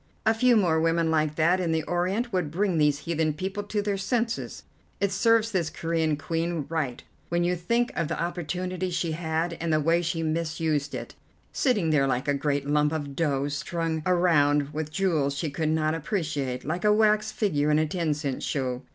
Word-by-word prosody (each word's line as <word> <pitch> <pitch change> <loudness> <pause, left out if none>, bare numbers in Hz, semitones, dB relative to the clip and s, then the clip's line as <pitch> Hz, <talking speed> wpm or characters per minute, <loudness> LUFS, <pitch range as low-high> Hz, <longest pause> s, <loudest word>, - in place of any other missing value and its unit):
A 220 - +5
few 245 +2 +4
more 165 -6 +3
women 165 0 +2
like 155 -1 +1
that 170 +4 +3
in 175 -3 0
the 160 -1 0
Orient 190 +8 -1
would 180 -5 0
bring 180 +1 0
these 150 -1 +2
heathen 160 -2 0
people 190 +6 -4
to 205 0 -2
their 200 -1 -1
senses. 230 +3 -2 0.4
It 200 -1 +1
serves 225 +3 +3
this 175 -5 0
Corean 165 -2 -1
Queen 165 0 -2
right 150 -7 -2 0.3
when 175 0 +1
you 180 +1 +1
think 235 +8 0
of 165 - 0
the 165 - -3
opportunity 180 +2 -3
she 170 -1 -1
had, 160 +1 -1
and 165 -1 -1
the 155 - +3
way 165 +3 +2
she 165 -1 -2
misused 160 -2 -1
it, - - -6 0.4
sitting 210 - +1
there 140 -3 +3
like 130 0 -1
a 145 - +3
great 140 0 -1
lump 150 +1 +2
of 145 -3 -4
dough 140 -4 0
strung 160 +2 -2
around 150 -5 +3
with 155 0 -3
jewels 155 -6 0
she 150 0 -2
could 155 +2 -1
not 155 0 +1
appreciate, 155 - -2
like 170 +4 -2
a 210 - +5
wax 215 0 +3
figure 150 -9 0
in 150 - +4
a 155 - +3
ten 160 -1 -1
cent 145 -3 -3
show. 130 -3 -2
165 Hz, 195 wpm, -26 LUFS, 150-185 Hz, 0.4 s, A